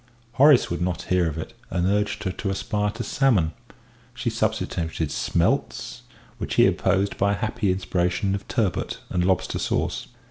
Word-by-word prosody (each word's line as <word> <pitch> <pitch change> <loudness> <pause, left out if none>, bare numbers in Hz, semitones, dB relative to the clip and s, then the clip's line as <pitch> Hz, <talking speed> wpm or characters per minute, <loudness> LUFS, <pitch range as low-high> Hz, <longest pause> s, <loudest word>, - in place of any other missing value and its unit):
Horace 135 - +5
would 85 - -2
not 90 0 -1
hear 90 -2 +3
of 80 -1 -3
it, 80 - -6 0.2
and 85 0 0
urged 105 +2 0
her 95 - -1
to 95 +2 -4
aspire 105 +1 -1
to - - -5
salmon; 110 - +2 0.6
she - - -2
substituted 80 -3 -1
smelts, - - 0 0.4
which - - -3
he - - +6
opposed 100 +1 +1
by 100 +1 +3
a - - -2
happy 110 -1 0
inspiration 90 +1 0
of 100 - -4
turbot 105 -6 -1
and 90 - +1
lobster 95 0 +1
sauce. - - -1
95 Hz, 165 wpm, -24 LUFS, 90-105 Hz, 0.6 s, he